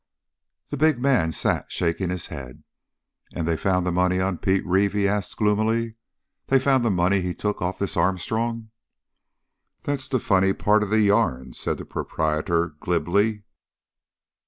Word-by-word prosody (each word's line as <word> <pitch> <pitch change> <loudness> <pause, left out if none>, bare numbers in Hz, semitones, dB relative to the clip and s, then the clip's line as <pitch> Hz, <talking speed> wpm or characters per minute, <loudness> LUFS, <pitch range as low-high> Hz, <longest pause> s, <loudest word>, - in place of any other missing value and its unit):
The 145 - -4
big 155 -2 +3
man 125 -12 +2
sat - - -1
shaking 85 +2 -1
his 90 -2 -3
head. 65 -4 -9 0.7
"And 85 -2 -2
they 85 - +1
found 90 +1 0
the 90 - 0
money 90 +1 +1
on 95 -2 -1
Pete 95 0 +1
Reeve?" 95 +2 +2
he 100 -1 +1
asked 100 -1 -2
gloomily. 110 +2 +1 0.5
"They 135 - +4
found 130 -1 +2
the 115 - +2
money 95 +1 +2
he 90 -1 -3
took 105 0 -3
off 90 +1 -2
this 100 - -3
Armstrong?" 110 +6 -1 1.1
"There's 140 -2 -2
the 130 - +1
funny 95 -3 +2
part 105 +2 +2
of 105 - -2
the 110 +1 +3
yarn," 100 - +1
said - - -2
the - - -8
proprietor 80 +2 -1
glibly. 100 +5 0
95 Hz, 155 wpm, -24 LUFS, 90-110 Hz, 1.1 s, They